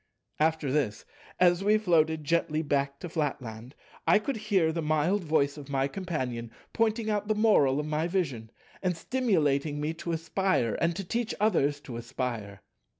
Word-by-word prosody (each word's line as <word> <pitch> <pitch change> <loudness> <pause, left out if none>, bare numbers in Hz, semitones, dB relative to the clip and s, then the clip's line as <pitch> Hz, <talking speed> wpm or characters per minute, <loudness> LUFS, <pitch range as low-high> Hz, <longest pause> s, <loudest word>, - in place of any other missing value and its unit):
After 155 -3 +1
this, 130 -8 -1 0.3
as 175 +1 +4
we 210 +2 +4
floated 160 -6 +2
gently 160 0 +1
back 140 -1 0
to - - -4
Flatland, 130 -6 -4 0.3
I - - +7
could 225 +4 -2
hear 200 -7 +2
the 165 +1 -2
mild 155 +6 +1
voice 150 -2 +1
of 145 -1 -10
my 135 -1 +1
Companion 130 - -4 0.2
pointing 225 0 +1
the 210 0 0
moral 150 -11 +4
of 150 - -2
my 155 +2 -1
vision, 140 - -2 0.3
and 180 -3 0
stimulating 155 - +1
me 150 +2 -1
to 165 +1 -5
aspire, 165 - 0
and 170 0 +2
to 195 - -4
teach 235 +5 -2
others 150 -9 +2
to 125 -5 -7
aspire. 120 -5 -4
160 Hz, 160 wpm, -28 LUFS, 140-190 Hz, 0.3 s, I